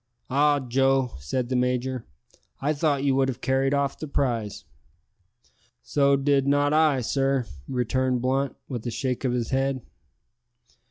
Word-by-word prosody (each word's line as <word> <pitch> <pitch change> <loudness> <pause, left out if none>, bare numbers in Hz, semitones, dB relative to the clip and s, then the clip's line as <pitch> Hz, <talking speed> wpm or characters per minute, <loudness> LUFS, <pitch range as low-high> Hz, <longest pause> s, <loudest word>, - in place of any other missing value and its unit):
"Ah, 145 +2 +3
Joe!" 135 0 +1
said 120 - -2
the 130 - 0
major, 125 0 -1 0.5
"I 145 +3 0
thought 145 -2 0
you 140 -1 +3
would 135 0 +2
have 130 -2 -3
carried 135 +1 +1
off 140 -1 0
the 155 - -5
prize." 120 -7 -2 1.2
"So 140 -1 +3
did 140 0 +2
not 145 +1 +3
I, 155 -4 +3
sir," 135 +1 0 0.2
returned 130 0 0
Blunt, 135 +2 0
with 120 -4 -5
a - - 0
shake 125 +3 -2
of 125 - +1
his 120 -2 -2
head. 135 -1 0
135 Hz, 150 wpm, -25 LUFS, 125-140 Hz, 1.2 s, Ah